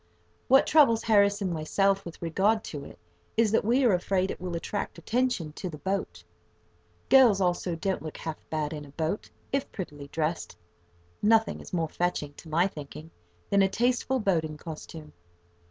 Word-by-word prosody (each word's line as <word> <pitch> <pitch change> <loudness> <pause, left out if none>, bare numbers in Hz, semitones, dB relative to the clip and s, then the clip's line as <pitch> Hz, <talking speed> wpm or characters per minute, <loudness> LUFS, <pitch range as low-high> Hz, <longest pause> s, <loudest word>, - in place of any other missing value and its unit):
What 270 +1 +6
troubles 275 -8 +5
Harris 205 -2 +3
and 185 -3 -1
myself, 195 +5 +1
with 170 0 -9
regard 200 +7 +2
to 145 -3 -6
it, - - -12 0.4
is 225 -2 +4
that 225 - +3
we 245 +6 +3
are 235 -5 +5
afraid 185 +1 +1
it - - -8
will 180 -2 -4
attract 200 +5 -4
attention 240 -9 -1
to 185 - -5
the 155 - -8
boat. 190 +7 -3 0.8
[Picture: 270 - +6
Young - - +9
lady] - - +4
Girls, 200 -2 0
also, 175 -1 0
don't 190 +3 -2
look 155 -1 -7
half 160 -1 -5
bad 155 -1 -2
in 150 -1 -6
a 145 - -12
boat, 160 +7 -3 0.2
if 275 0 -1
prettily 145 -7 -7
dressed. 160 +3 -3 0.6
Nothing 220 +1 +3
is - - -11
more 165 -3 -1
fetching, 175 -5 -2
to 160 - -11
my 165 +3 +3
thinking, 155 -2 -8 0.4
than 200 - +5
a 195 - +4
tasteful 250 +4 +1
boating 160 -7 0
costume. 155 -1 -9
185 Hz, 185 wpm, -28 LUFS, 160-210 Hz, 0.8 s, Young